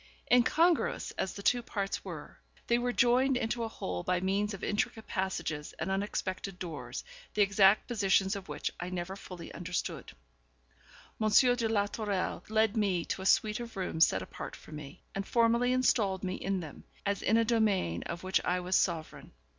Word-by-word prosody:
Incongruous 320 +8 +3
as 190 - -3
the 200 - -8
two 245 +3 +3
parts 200 -4 -3
were, - - -8 0.3
they 235 0 +2
were 245 0 0
joined 245 +4 +3
into 235 0 -1
a - - -1
whole 90 - -4
by 180 - 0
means 195 +3 0
of 190 - -12
intricate 215 +1 -1
passages 185 -6 -3
and 165 +4 -2
unexpected 195 -1 -2
doors, 165 -5 -6 0.3
the 210 - +5
exact 200 0 +5
positions 195 -3 +2
of 195 -4 -7
which 150 0 -3
I 180 - -4
never 180 +1 -4
fully 180 -4 -9
understood. 180 0 -4 1.1
M. 215 - +3
de 245 +1 +4
la 205 -2 +2
Tourelle 205 -4 -2
led 220 0 +2
me 195 -6 +1
to - - -3
a 190 - -1
suite 215 +2 +3
of 235 -3 -7
rooms 170 -3 +3
set 95 - -2
apart - - -7
for - - -15
me, 150 +2 -9
and 195 - -2
formally 235 +3 +3
installed 210 -7 +2
me 185 -1 -1
in 195 -1 -2
them, 155 -4 -9 0.2
as 200 -1 0
in 225 - +3
a 230 - +3
domain 210 - +1
of 170 +1 -5
which 185 0 +1
I 180 +1 +1
was 180 +1 -1
sovereign. 165 -3 -1
195 Hz, 180 wpm, -31 LUFS, 180-225 Hz, 1.1 s, the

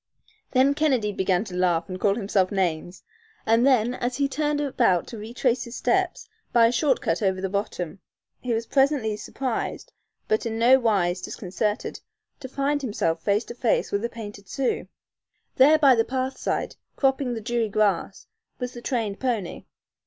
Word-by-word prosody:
Then 265 +2 +4
Kennedy 265 -8 +1
began 190 -1 +1
to 190 -5 -8
laugh 175 -2 +1
and 185 0 -6
call 200 0 +2
himself 195 -4 0
names, 175 -2 -2 0.4
and 230 +4 +4
then, 245 -3 +3
as 245 0 -3
he 280 -1 +2
turned 295 +2 -1
about 250 - +2
to 230 - -7
retrace 240 +3 -1
his 235 +1 -9
steps - - 0 0.2
by 235 -1 +5
a 230 - +4
short 265 +1 +1
cut 165 +5 -1
over 190 -2 +1
the 190 0 -2
bottom, 195 -3 -3 0.4
he 250 - -4
was 230 0 0
presently 270 -5 +2
surprised, 240 +3 -4 0.3
but 215 - +1
in 225 0 -3
no 250 +3 +6
wise 190 -6 +1
disconcerted, 205 +5 -3 0.4
to 260 -3 -8
find 285 +2 0
himself 165 -10 -1
face 205 +5 +1
to - - -7
face 240 -1 0
with 200 +1 -1
a 235 - -1
painted 205 -4 -9
Sioux. 270 -2 -1 0.7
There 290 +4 +7
by 280 -4 +6
the 225 -2 +3
path 260 +2 -2
side, - - -3 0.2
cropping 265 -2 +1
the - - -4
dewy 235 0 -1
grass, 200 -2 0 0.3
was 250 -1 -5
the 240 - -9
trained 225 -6 -2
pony. 230 -9 -2
230 Hz, 175 wpm, -25 LUFS, 200-260 Hz, 0.7 s, There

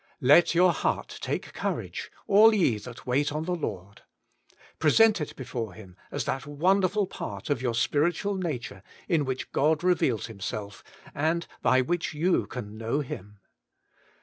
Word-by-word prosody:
* - - -50
Let 170 +1 +5
your 180 0 +5
heart - - -2
take - - -3
courage, - - -4
all 215 +2 +6
ye 130 - +2
that 120 +2 -11
wait 140 +4 +1
on 155 +1 -2
the 180 +2 -2
Lord.' 100 - -5 0.8
Present 210 +5 +5
it 150 - -5
before 115 -6 -5
Him 95 -5 -13
as - - -3
that 135 +2 -3
wonderful 185 +6 +2
part 100 - -6
of 140 - 0
your 120 -3 -1
spiritual 170 - +1
nature 140 - -4 0.3
in 160 -6 +2
which 130 0 -4
God 155 +3 +2
reveals 160 - +2
Himself, 100 -1 -6 0.3
and 160 +3 0 0.2
by 130 - +4
which 165 +3 -2
you 175 +4 +1
can 110 -3 -7
know 115 +6 -1
Him. 105 -6 -8
145 Hz, 155 wpm, -27 LUFS, 115-175 Hz, 0.8 s, all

